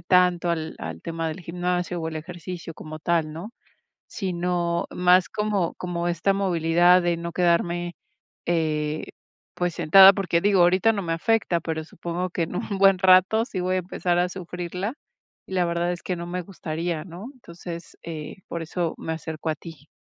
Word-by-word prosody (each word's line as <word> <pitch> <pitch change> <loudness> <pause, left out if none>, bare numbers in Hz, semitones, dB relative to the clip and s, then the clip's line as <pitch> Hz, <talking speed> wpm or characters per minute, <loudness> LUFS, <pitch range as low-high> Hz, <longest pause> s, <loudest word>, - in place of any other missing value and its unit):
tanto 180 -1 +3
al 160 -2 -2
al 80 0 -6
tema 165 -1 -3
del 160 +4 -6
gimnasio, 175 0 -2
o, 160 - -3
al 160 -1 -4
ejercicio 175 +1 -7
como 155 0 -9
tal, 160 -2 0
¿no? 180 +8 -7 0.6
Sino 175 -3 -1
más 180 0 +4
como 210 -5 0
como 175 -1 -3
esta 175 +3 +1
movilidad 175 -1 +4
de 175 -1 +1
no 170 0 -5
quedarme, 175 0 +1 0.5
eh, 155 -2 -1 0.5
pues, 175 -1 -1
sentada, 190 +5 +8
porque, 180 -4 +1
digo, 200 -2 +4
ahorita 185 +6 +4
no 200 -2 -2
me 165 -2 -2
afecta, 180 -1 +1
pero 160 -1 -3
supongo 170 +3 -4
que 170 - -1
en 165 +2 -3
un 200 0 -3
buen 195 -1 +6
rato 190 +4 +5
sí 190 - -4
voy 185 +1 0
a - - +2
empezar 175 -1 -1
a 180 - +2
sufrirla, 180 +4 -5 0.5
y - - -11
la 180 - +2
verdad 170 +1 0
es 175 - -6
que 180 - -2
no 170 0 -6
me 180 +1 -3
gustaría, 170 -2 -4
¿no? 180 +4 -9
Entonces, 170 -7 -9
eh, 155 0 -6
por 170 - -4
eso 165 0 -2
me 160 - -4
acerco 160 0 -4
a - - 0
ti. 160 -4 -12
175 Hz, 180 wpm, -25 LUFS, 165-180 Hz, 0.6 s, sentada